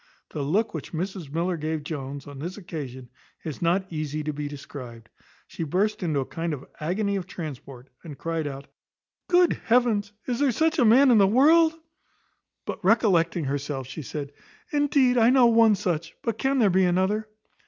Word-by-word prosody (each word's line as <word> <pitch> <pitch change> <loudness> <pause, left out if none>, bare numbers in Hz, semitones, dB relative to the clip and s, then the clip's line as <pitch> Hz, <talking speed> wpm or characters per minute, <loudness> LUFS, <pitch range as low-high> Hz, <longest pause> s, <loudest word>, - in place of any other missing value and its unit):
The 150 - -4
look 190 +11 0
which 160 0 -7
Mrs 180 -2 -4
Miller 170 +3 -1
gave 155 0 -3
Jones, 140 -2 -6
on 145 -1 -10
this 175 +7 -6
occasion, 140 -10 -7 0.4
is 155 -3 -6
not 175 +3 +1
easy 155 -1 -3
to 150 0 -3
be 145 0 -4
described. 125 -5 -9 0.4
She - - -9
burst 205 +7 0
into 155 -6 0
a - - -4
kind 165 +1 -3
of 135 - -12
agony 200 +6 -1
of 185 -2 -5
transport, 140 -7 -8 0.2
and 150 -4 -9
cryed 165 -1 -3
out 140 0 -7 0.6
"Good 355 -1 +4
heavens! 225 -4 +2
is 245 -2 -2
there 285 -2 +3
such 320 +6 +1
a 245 - +5
man 255 +4 +6
in 225 - +6
the 195 - +6
world?" 320 +8 +5 0.9
But - - -6
recollecting 180 -5 +3
herself, 140 -1 -3
she 140 +5 -7
said, 145 0 -6 0.4
"Indeed 280 -4 +3
I 230 +1 +5
know 255 -1 +5
one 230 -2 +5
such; 170 -4 -3
but 230 - -2
can 270 0 +1
there 215 -6 +4
be 190 +1 +3
another?" 190 +4 +1
175 Hz, 180 wpm, -25 LUFS, 145-225 Hz, 0.9 s, man